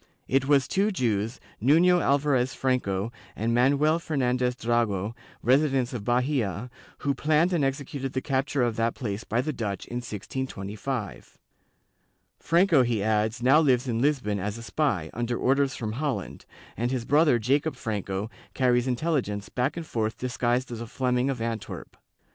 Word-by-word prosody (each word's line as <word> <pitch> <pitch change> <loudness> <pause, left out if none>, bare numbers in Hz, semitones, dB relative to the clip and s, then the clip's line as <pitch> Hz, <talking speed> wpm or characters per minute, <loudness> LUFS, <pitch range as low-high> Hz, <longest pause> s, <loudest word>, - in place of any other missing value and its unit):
It 135 0 +1
was 140 -2 +4
two 200 +2 +1
Jews, 115 - -1 0.2
Nuiio 170 +8 +5
Alvarez 135 -3 +2
Franco 115 -6 0 0.2
and 115 +2 -1
Manuel 145 +6 +3
Fernandez 125 -5 0
Drago, 115 -4 0 0.3
residents 135 -1 +2
of 115 -4 -4
Bahia, 125 -2 0 0.3
who 140 - +2
planned 155 +6 +2
and 165 -5 +2
executed 135 0 -3
the 130 - 0
capture 135 -1 0
of 120 -2 0
that 115 0 0
place 110 -4 -4
by 120 - 0
the 155 +3 -3
Dutch 105 -6 -4
in 120 - -5
1625. 110 -1 -5 1.0
Franco, 170 -3 +4
he 120 -5 0
adds, 110 +2 0
now 135 +5 +6
lives 130 -4 +3
in 115 -1 -1
Lisbon 130 -8 +1
as 105 +3 -3
a 115 - -8
spy, 100 - -1
under 120 0 -2
orders 135 0 +2
from 110 -2 -4
Holland, 125 -5 -3 0.3
and 120 +2 -1
his 125 -2 -2
brother 145 -1 +4
Jacob 140 +7 +1
Franco 105 -2 -3 0.2
carries 125 -1 +2
intelligence 125 -7 -1
back 125 +6 -1
and 165 - -4
forth 110 -5 -2
disguised 125 0 -1
as 115 -1 -5
a 115 - -6
Fleming 125 +2 0
of 135 -3 -2
Antwerp. 115 -3 -5
125 Hz, 155 wpm, -26 LUFS, 115-140 Hz, 1.0 s, now